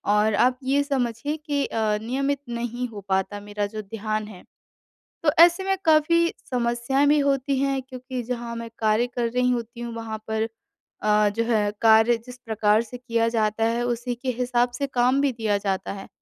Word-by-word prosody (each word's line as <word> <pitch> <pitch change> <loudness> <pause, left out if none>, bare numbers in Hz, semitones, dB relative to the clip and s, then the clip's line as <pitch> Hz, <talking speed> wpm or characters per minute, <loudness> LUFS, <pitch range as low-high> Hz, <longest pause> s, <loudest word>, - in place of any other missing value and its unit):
और 210 0 +3
आप 250 0 +1
ये 275 +2 +2
समझिए 270 0 -1
कि 290 -2 -1
अ, 215 -2 0
नियमित 275 +4 -1
नहीं 240 +1 -3
हो 215 -4 -9
पाता 190 +2 0
मेरा 205 0 -1
जो 215 +1 -5
ध्यान 215 +1 -4
है। 195 -4 -12 0.8
तो 315 - +4
ऐसे 345 +3 +6
में 385 0 +1
काफ़ी 330 +2 +4 0.2
समस्याएँ 245 +3 +1
भी 295 +1 +5
होती 275 -1 +1
हैं 275 0 0
क्योंकि 255 -1 -6
जहाँ 235 -1 -4
मैं 230 0 -6
कार्य 220 +2 +2
कर 240 -1 +1
रही 250 0 +2
होती 235 0 -3
हूँ 235 -1 -5
वहाँ 225 -1 -5
पर 220 0 0 0.5
अ, 210 0 +4
जो 225 +3 -1
है 215 -3 +1
कार्य 225 +1 +6
जिस 250 0 -10
प्रकार 215 0 +2
से 235 +2 -9
किया 230 -2 0
जाता 220 -1 0
है, 230 +1 0
उसी 240 +1 -2
के 255 +2 -3
हिसाब 245 -1 +1
से 280 - 0
काम 255 0 +2
भी 280 -1 +2
दिया 220 -3 0
जाता 195 -1 -2
है 195 -1 -9
235 Hz, 190 wpm, -24 LUFS, 220-260 Hz, 0.8 s, ऐसे